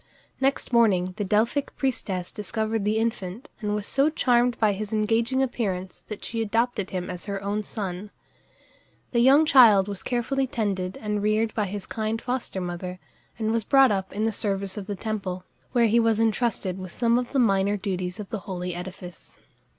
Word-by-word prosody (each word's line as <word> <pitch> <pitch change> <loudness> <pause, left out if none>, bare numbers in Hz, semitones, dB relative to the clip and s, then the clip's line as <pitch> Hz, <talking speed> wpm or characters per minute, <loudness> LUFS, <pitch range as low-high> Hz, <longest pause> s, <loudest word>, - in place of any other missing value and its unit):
Next 270 -2 0
morning 190 -6 +3
the 210 - -1
Delphic 220 +8 0
priestess 195 -9 -2
discovered 220 0 -2
the 215 +1 +1
infant, 225 +1 -3
and 210 -2 -1
was 210 -1 -3
so 275 +6 +2
charmed 245 -5 +2
by 215 -2 +3
his 205 +1 -5
engaging 225 +4 +1
appearance 190 -8 -3
that 210 - -7
she 230 -1 -3
adopted 225 -1 0
him 180 -1 -3
as 180 -1 -6
her 200 -1 -2
own 205 +1 -1
son. 200 -1 -5 1.0
The 235 - +2
young 275 +6 +6
child 220 -9 +7
was 200 -2 -5
carefully 260 +2 -1
tended 200 -7 -2
and 210 -1 -2
reared 215 +1 +1
by 210 - 0
his 200 0 -5
kind 220 0 -2
foster 245 -5 -3
mother, 180 0 -5 0.4
and 220 -1 0
was 230 -1 0
brought 270 +2 +5
up 190 -2 -2
in 210 +2 -1
the 225 - +1
service 195 -2 -1
of 200 -2 -6
the 205 - -3
temple, 190 -3 -4 0.3
where 240 -2 +4
he 230 +1 +4
was 225 -1 +2
intrusted 220 -4 0
with 185 -1 -7
some 235 +3 +2
of 250 - -5
the 280 - -1
minor 200 -4 +3
duties 185 -1 -3
of 205 - -7
the 220 - -2
holy 180 -1 -3
edifice. 180 -1 -9
210 Hz, 185 wpm, -25 LUFS, 190-235 Hz, 1.0 s, child